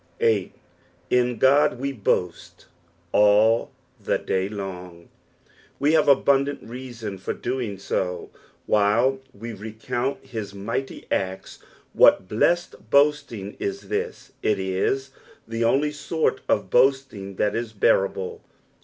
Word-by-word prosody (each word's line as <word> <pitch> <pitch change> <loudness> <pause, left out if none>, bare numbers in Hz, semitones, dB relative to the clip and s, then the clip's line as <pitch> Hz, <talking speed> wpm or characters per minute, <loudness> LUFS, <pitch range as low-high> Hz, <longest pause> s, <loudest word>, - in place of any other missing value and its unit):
e. 105 -5 +2 0.3
" 85 0 -35
In 125 0 +2
Ood 115 - -8
ire 140 0 +3
boait 90 -6 -2 0.5
all 105 +2 +4 0.3
the - - +1
day 95 +1 -1
long." 90 -4 -7 0.7
We 145 +3 +2
have 155 -2 +4
abuadsat 140 0 +3
reason 115 -5 -7
for - - -3
doing 120 -5 -3
so 90 -2 -3 0.3
while 115 +6 +3
we 115 +1 -8
recount 110 +6 -4
his 110 -6 -6
mighty 105 +7 -4
acts. 95 0 -3 0.3
What 95 - +5
blessed 170 - 0
boasting 140 -8 +2
is 395 0 -4
this 440 +2 -4
I - - 0
it 105 -2 +2
is 95 +9 -1 0.4
the 115 +1 -2
only 140 +6 +2
sort 150 -1 -1
of 100 -3 +1
boasting 125 -7 +2
that 105 +2 0
is 115 -1 -3
bearable. 95 -2 +1
115 Hz, 125 wpm, -24 LUFS, 100-135 Hz, 0.7 s, What